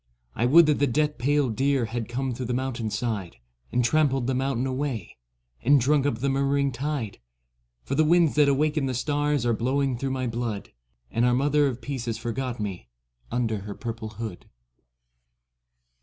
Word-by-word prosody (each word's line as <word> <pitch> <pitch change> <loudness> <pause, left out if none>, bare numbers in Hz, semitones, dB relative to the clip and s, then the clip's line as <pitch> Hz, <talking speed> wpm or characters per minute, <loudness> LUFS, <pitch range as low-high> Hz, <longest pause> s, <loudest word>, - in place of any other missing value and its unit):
1 120 +2 +1
would 165 +4 +8
that 150 -1 +2
the 145 - +3
death 150 +3 0
pale 145 +2 +2
deer 130 +2 +1
Had 115 0 -4
come 130 +1 -2
through 125 0 -4
the 125 - -1
mountain 125 -3 -2
side, 105 -6 -3 0.4
And 125 0 +2
trampled 135 -3 +2
the 130 - 0
mountain 130 -1 0
away, 130 -6 -3 0.5
And 140 +3 +5
drunk 140 +2 +2
up 115 -4 -2
the 140 - +1
murmuring 140 +1 +1
tide; 130 -4 -3 0.6
For - - -4
the 155 +3 +4
winds 165 0 +4
that 145 -1 +4
awakened 150 0 +1
the 130 - -2
stars 145 0 0
Are 120 - +2
blowing 130 +3 0
through 135 - -2
my 130 -1 -2
blood. 115 -3 -3 0.4
And 115 - +1
our 125 0 +4
Mother 145 +2 +3
of 125 -2 -4
Peace 135 -4 -4
has 115 -2 -2
forgot 120 +1 -3
me 95 - -5 0.4
Under 115 -3 0
her 100 +1 -7
purple 115 -2 -5
hood. 110 -3 -7
130 Hz, 180 wpm, -26 LUFS, 115-140 Hz, 0.6 s, would